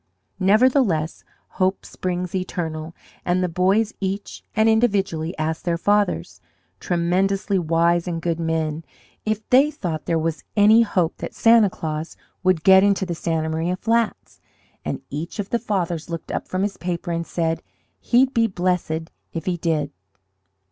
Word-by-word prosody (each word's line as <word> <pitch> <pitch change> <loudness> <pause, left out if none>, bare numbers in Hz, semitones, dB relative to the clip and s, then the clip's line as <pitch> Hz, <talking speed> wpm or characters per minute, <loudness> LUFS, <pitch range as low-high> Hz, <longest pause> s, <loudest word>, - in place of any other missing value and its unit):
Nevertheless, 200 - +3 0.4
hope 185 +1 +1
springs 180 -1 -4
eternal, 165 -3 -4 0.3
and 180 +1 +1
the - - +2
boys 190 +5 +2
each 195 +1 -4
and 220 +1 +4
individually 195 -8 +1
asked 160 +1 -2
their 170 -1 0
fathers 205 +3 0 0.4
tremendously 190 +3 +1
wise 170 +1 +2
and 170 -2 -2
good 170 0 -2
men 160 -1 -1 0.4
if 215 0 -1
they 270 +4 +6
thought 170 - -4
there 165 - +2
was 160 0 -2
any 215 +3 +7
hope 180 -7 0
that - - -7
Santa 225 -3 +5
Claus 155 -2 -5 0.2
would 185 -4 +2
get 190 0 +7
into 200 -1 +2
the 175 - -3
Santa 160 -1 -1
Maria 165 +3 -1
flats, 230 +3 -1 0.4
and - - -4
each 155 +5 -5
of 205 -2 -4
the 235 - +1
fathers 175 -8 -2
looked 165 -1 -5
up - - -3
from 185 +1 -1
his 200 -1 -2
paper 175 -1 -3
and 170 0 -2
said 165 -1 -1 0.4
he'd 255 +2 +3
be 230 -1 +3
blessed 175 -4 -1 0.2
if 165 -1 -4
he 185 - 0
did! 160 -4 -1
180 Hz, 155 wpm, -22 LUFS, 165-205 Hz, 0.4 s, any